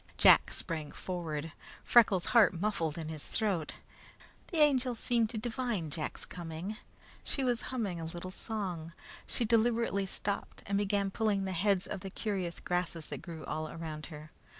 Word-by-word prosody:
Jack - - +7
sprang 155 -4 -3
forward. 165 -4 -4 0.3
Freckles' 205 -7 +5
heart 220 -7 +6
muffled 170 -6 0
in 160 -2 -4
his 155 -2 -5
throat. 195 -8 0 0.7
The 340 - -3
Angel 265 -5 +4
seemed 230 -1 +1
to 230 - -5
divine 225 - -2
Jack's 155 +2 -3
coming. 175 +4 -6 0.5
She 275 - -1
was 245 -2 +1
humming 210 -9 -2
a - - -4
little 175 +3 -6
song. 185 -7 -3 0.3
She 240 - +1
deliberately 225 -3 +2
stopped 200 +1 -3
and 200 0 +1
began 200 -1 +1
pulling 205 -2 +1
the 190 - -2
heads 190 +1 +2
of - - -4
the 195 - -6
curious 190 -4 -2
grasses 175 -3 -2
that - - -5
grew 165 -3 -7
all 155 0 -3
around 155 -2 -6
her. 155 -1 -10
190 Hz, 160 wpm, -32 LUFS, 165-220 Hz, 0.7 s, Jack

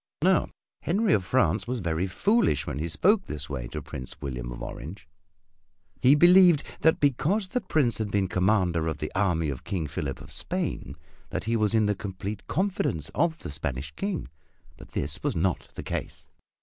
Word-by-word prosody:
Now - - +3 0.3
Henry 195 +2 +2
of 95 - +2
France 130 +4 +1
was 125 +1 -1
very 85 -1 -1
foolish 200 - +2
when 70 - -4
he 80 +2 -2
spoke 195 - +3
this 75 0 -4
way - - -3
to - - -6
Prince 65 -1 -8
William 60 -3 -5
of - - -7
Orange. 90 +7 -8 0.9
He 135 +3 +7
believed 175 -1 +7 0.2
that 160 - +4
because 150 - +2
the 250 +6 -1
Prince 135 - +1
had 110 -2 -1
been 100 -1 +1
commander 90 -3 +2
of 80 -2 -2
the 75 - -4
army 85 -5 +1
of 65 - -7
King 90 -6 -2
Philip 70 -2 -4
of - - -12
Spain - - -3 0.3
that - - -3
he 115 +3 0
was 110 0 +2
in 110 -1 +4
the 105 - +2
complete 100 0 -6
confidence 170 - -1
of 165 0 +1
the - - -7
Spanish 70 0 -3
King 195 - -3 0.5
but - - -15
this 70 +2 -2
was - - -1
not 90 +1 0
the - - -6
case. - - -5
100 Hz, 185 wpm, -27 LUFS, -, 0.9 s, He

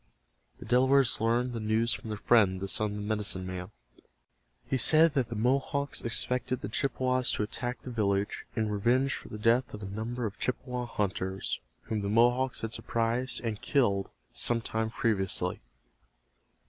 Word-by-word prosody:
The - - -10
Delawares 130 0 +4
learned 120 +2 +1
the 115 - -3
news 110 +2 +1
from 110 - -6
their 105 - -3
friend, 100 -4 +4
the 100 - -4
son 105 +2 +1
of - - -5
the 105 - -4
medicine 105 -3 -2
man. 90 0 -5 1.0
He - - -1
said 155 +4 +5
that 130 -4 0
the 115 - -4
Mohawks 135 +5 0
expected 125 +2 -1
the 100 - -4
Chippewas 130 +1 0
to - - 0
attack 120 +3 -4
the 125 - -6
village 100 -3 -1
in 110 -2 0
revenge 120 +6 +2
for - - -6
the 105 - -6
death 115 +3 +2
of 105 - -9
a - - -4
number 110 +5 -4
of 100 -2 -5
Chippewa 125 -1 -2
hunters 95 -3 -2 0.2
whom 110 -2 -3
the 100 - -2
Mohawks 120 +4 +3
had 115 0 -4
surprised 115 +3 -1
and 110 -3 -3
killed 100 -9 +1 0.2
some 120 -1 +1
time 110 0 -2
previously. 95 -5 0
115 Hz, 170 wpm, -29 LUFS, 105-125 Hz, 1.0 s, said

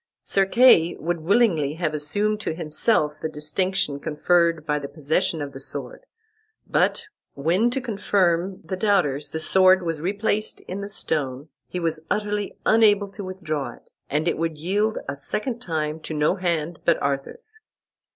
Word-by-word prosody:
Sir 195 -1 +2
Kay 195 -8 +6
would 170 +1 -2
willingly 165 -5 +2
have 160 -2 -1
assumed 205 +9 0
to 165 - -3
himself 155 -1 +1
the 160 - -2
distinction 155 0 -1
conferred 165 +1 +1
by 150 -2 0
the 140 - -6
possession 155 +2 -1
of 140 - -6
the 135 - -9
sword, - - -6 0.6
but - - +1 0.3
when, 175 +11 +2
to 260 +2 -1
confirm 195 -6 0
the 170 +3 -4
doubters, 180 -8 +1
the 160 - -4
sword 185 +3 +5
was 165 -3 -2
replaced 205 +4 -1
in 185 - -6
the 200 0 -5
stone 145 -6 -2 0.2
he 180 - -4
was 160 -2 -1
utterly 210 -1 -2
unable 205 -3 +4
to 200 +1 -7
withdraw 170 -7 -4
it, - - -21 0.2
and 150 +4 0
it 170 - 0
would 165 -1 -1
yield 205 +7 0
a - - -3
second 225 - -3
time 155 -4 -2
to 155 0 -6
no 150 +2 +2
hand 170 -3 -2
but 170 - +3
Arthur's. 140 - -3
170 Hz, 160 wpm, -24 LUFS, 150-200 Hz, 0.6 s, Kay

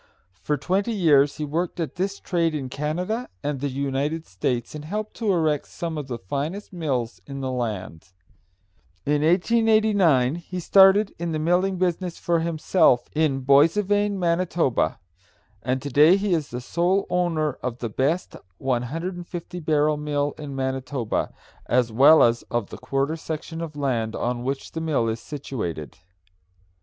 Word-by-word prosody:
For 150 - 0
twenty 190 - 0
years 145 -8 +4
he 155 - -2
worked 170 +4 -2
at 165 - -2
this 195 +2 -2
trade 170 -3 0
in 135 -3 -4
Canada 180 - -3
and 145 -1 -2
the 140 +1 -2
United 140 +4 -2
States, 120 +6 -2
and 150 -1 -7
helped 210 +7 -4
to 220 -3 +1
erect 155 -5 +1
some 165 -2 -5
of 150 -3 -5
the 120 -3 -4
finest 145 - -4
mills 130 - -2
in 140 0 -6
the 130 -1 -2
land. 105 -9 -4 1.0
In 145 0 +1
1889 190 - +3
he 180 +1 -6
started 195 +3 +5
in 170 -1 -2
the - - 0
milling 180 +4 +1
business 180 -1 -1
for 170 -1 +1
himself 160 -5 +2
in 150 -3 +1
Boissevain, 200 +9 +3
Man., 170 -2 +1 1.2
and 130 +2 -1
to 145 - -3
day 155 +8 +6
he 200 -1 0
is 155 -4 0 0.2
sole 180 +4 +1
owner 165 -5 0
of 125 -2 -3
the 120 - -3
best 140 - -1 0.2
150 170 +8 -4
barrel 150 -1 +2
mill 145 -1 -1
in 145 -3 -7
Manitoba, 130 -2 -2 0.4
as 125 -1 +2
well 140 +8 +7
as 120 0 +3
of 120 -4 -2
the - - -7
quarter 140 +3 -1
section 160 +1 -6
of 160 -3 -6
land 120 -6 -1
on 120 0 -2
which 135 +1 -3
the 160 - -4
mill 150 -8 0
is 110 0 -2
situated. 105 - -6
155 Hz, 155 wpm, -24 LUFS, 135-175 Hz, 1.2 s, well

